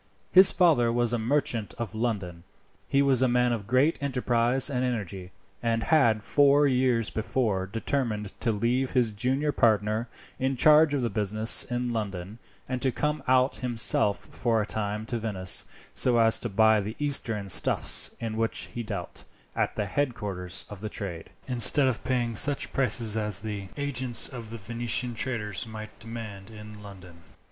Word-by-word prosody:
His 190 +1 +8
father 150 -11 +2
was 120 0 0
a 120 - -1
merchant 115 - -1
of 115 -2 -5
London. 100 -7 -4 0.4
He 140 0 +2
was 135 -3 +2
a 130 - +3
man 125 0 +1
of 105 -4 -6
great 130 +7 +1
enterprise 125 -1 +1
and 130 -4 -1
energy, 100 -7 -4 0.3
and 115 -1 -1
had 115 -9 +2
four 145 +3 +3
years 125 -4 +1
before 110 -4 -2
determined 110 -1 -3
to 115 - 0
leave 120 +5 -1
his 125 -4 +1
junior 130 +8 -1
partner 110 -1 0 0.3
in 135 +1 -1
charge 150 +3 +4
of 135 - -2
the 115 - -2
business 110 +2 +3
in 120 0 -4
London, 100 -1 -6 0.3
and 130 -1 -4
to 130 - +1
come 150 +4 -2
out 130 +1 +2
himself 115 -4 0
for 115 -2 -1
a 105 - -1
time 105 0 -3
to 120 0 -4
Venice, 95 -5 0 0.3
so 125 -2 +2
as 115 -1 +4
to 120 - -5
buy 110 +1 +3
the 105 +3 -6
Eastern 115 -8 0
stuffs 95 - +1
in 110 -1 -5
which 115 0 -2
he 120 - -5
dealt 110 - -7 0.3
at - - -2
the 105 - -2
headquarters 100 -7 -3
of 105 -2 -11
the 110 - -5
trade, 90 -6 -7 0.2
instead 130 +3 +7
of 125 -3 -2
paying 120 -3 -2
such 145 +5 +1
prices 115 -4 +4
as 105 -2 0
the 105 -3 -6
agents 130 -4 +3
of 120 -5 -9
the 115 - -6
Venetian 120 +3 -1
traders 110 -4 -1
might 110 -1 -10
demand 110 -4 -8
in 105 -1 -12
London. 90 -4 -14
115 Hz, 170 wpm, -26 LUFS, 105-130 Hz, 0.4 s, His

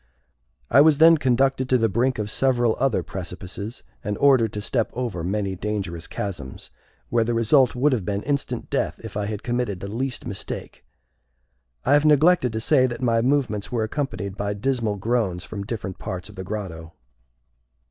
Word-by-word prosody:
I 140 - +7
was 155 -1 +5
then 165 +1 +7
conducted 130 0 +1
to 130 - +5
the 115 -2 +2
brink 120 +5 +1
of 105 -1 -3
several 120 -3 +2
other 135 -3 +1
precipices, 95 +4 -7 0.2
and 105 0 -2
ordered 130 -6 +4
to 105 - -3
step 115 +1 0
over 115 -9 -3
many 100 +1 -1
dangerous 95 -4 -4
chasms, 85 -10 -6 0.4
where 120 -1 +2
the 115 +1 -1
result 125 +3 +4
would 135 +3 +3
have 115 -6 -1
been 100 +2 -2
instant 140 0 -2
death - - -1
if - - -8
I 105 -1 -1
had 105 0 -5
committed 120 -6 -1
the 100 - -6
least 125 +5 -3
mistake. 95 - -6 1.0
I 135 - +4
have 145 0 +5
neglected 155 -2 +4
to 110 - -1
say 130 +2 +4
that 125 +1 -5
my 115 -2 +3
movements 115 -6 0
were 115 -3 0
accompanied 110 -5 -3
by 100 0 -2
dismal 115 -1 -1
groans 100 -4 -1
from 100 -2 -6
different 95 -5 -5
parts 90 -1 -5
of - - -13
the 95 - -6
grotto. 90 -5 -6
115 Hz, 180 wpm, -24 LUFS, 100-130 Hz, 1.0 s, I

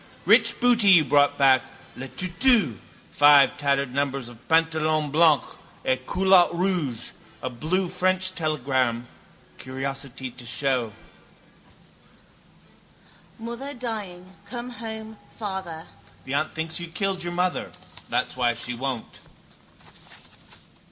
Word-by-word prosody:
_ - - -23 0.2
Rich - - +4
booty 240 -4 +3
you 175 -5 +7
brought 145 +1 +3
back; 135 -2 +5 0.3
Le 130 +2 -7
Tutu, 185 - +3 0.4
five 145 -1 +6
tattered 140 -2 -1
numbers 140 -3 -2
of 120 +1 -17
Pantalon 155 -2 +1
Blanc 155 -2 +4 0.4
et 130 0 -1
Culotte 190 -2 +4
Rouge; 170 -10 -1 0.3
a 130 - -3
blue 170 +10 -1
French 185 +1 +2
telegram, 130 -7 -1 0.5
curiosity 135 0 -5
to 125 - -11
show: 125 -1 0 2.5
—Mother 235 +5 -7
dying 210 -7 -6 0.2
come 240 +3 -7
home 220 -1 -8 0.2
father. 190 -6 -6 0.4
The 130 - -5
aunt 155 +2 -1
thinks 160 +1 -3
you 170 - -6
killed 190 +1 -3
your 175 0 -4
mother. 180 +1 -1 0.4
That's - - -1
why 120 -2 +1
she 120 +1 -3
won't. 125 -1 -5
155 Hz, 115 wpm, -24 LUFS, 135-185 Hz, 2.5 s, you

